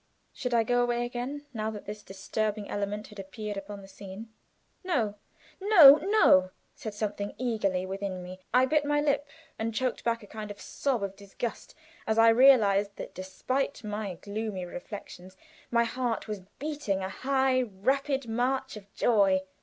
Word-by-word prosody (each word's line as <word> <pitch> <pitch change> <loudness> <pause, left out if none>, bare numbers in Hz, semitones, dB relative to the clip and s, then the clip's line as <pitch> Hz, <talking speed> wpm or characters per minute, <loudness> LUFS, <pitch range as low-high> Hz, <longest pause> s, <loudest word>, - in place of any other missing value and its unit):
Should 250 -3 -2
I 230 - +4
go 245 +2 +2
away 240 0 +1
again 250 +4 -5
now 215 -1 -2
that 210 -2 -7
this 210 +1 -7
disturbing 210 +2 -3
element 205 +1 -3
had 210 - -12
appeared 205 +2 -6
upon 200 0 -7
the - - -12
scene? 200 +3 -10 0.5
No, 250 - 0 0.5
no, 345 -9 +9
no, 310 - +4 0.2
said 215 -2 -7
something 205 -1 -3
eagerly 205 -7 0
within 190 -1 -4
me, 180 - -8
and 185 - -10
I 250 +2 +5
bit 300 +2 +2
my 295 0 +1
lip, 290 0 0 0.3
and 225 0 -2
choked 255 0 -1
back 230 -1 0
a - - -10
kind 215 0 -7
of 205 - -8
sob 260 -7 -2
of 195 -1 -4
disgust 200 +4 -6 0.3
as 220 0 +1
I 225 0 +7
realized 215 -5 +5
that - - -8
despite 255 +9 -3
my 210 -3 -4
gloomy 205 0 -4
reflections 190 -3 -9 0.3
my 235 -1 +3
heart 235 -1 -2
was 210 -2 -4 0.2
beating 285 -10 -2
a 190 - -3
high, 265 +3 +1
rapid 265 +5 -1
march 255 +3 -1
of 200 -2 -12
joy! 200 -5 +3
220 Hz, 170 wpm, -29 LUFS, 200-255 Hz, 0.5 s, no